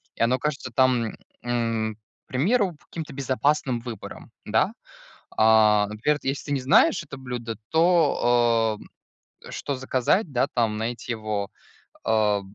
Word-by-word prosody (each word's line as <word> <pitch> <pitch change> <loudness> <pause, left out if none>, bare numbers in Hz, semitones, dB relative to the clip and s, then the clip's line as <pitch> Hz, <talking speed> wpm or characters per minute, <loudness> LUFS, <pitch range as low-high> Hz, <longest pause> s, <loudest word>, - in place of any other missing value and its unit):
и - - -8
оно 125 +2 +2
кажется 140 -3 -3
там, 125 -3 +2 0.3
м, 115 -3 -1 0.3
к - - -75
примеру, 185 - +1
каким-то 160 -2 -6
безопасным 135 -2 0
выбором, 115 -4 -9
да. - - +2 0.6
А, 110 -2 +5
например, 110 +8 0
вот - - -23
если 135 +1 -2
ты 145 - -6
не 140 -2 0
знаешь 205 - +4
это 140 -2 -10
блюдо, 120 -3 -5
то, 120 -10 +3 0.7
а, - - -9
что 140 - -4
заказать, 130 - 0
да, 130 +1 +2
там, 115 -3 +1
найти 120 +2 -3
его? 105 -3 -3 0.5
А. 105 -2 +2
120 Hz, 140 wpm, -25 LUFS, 110-140 Hz, 0.7 s, А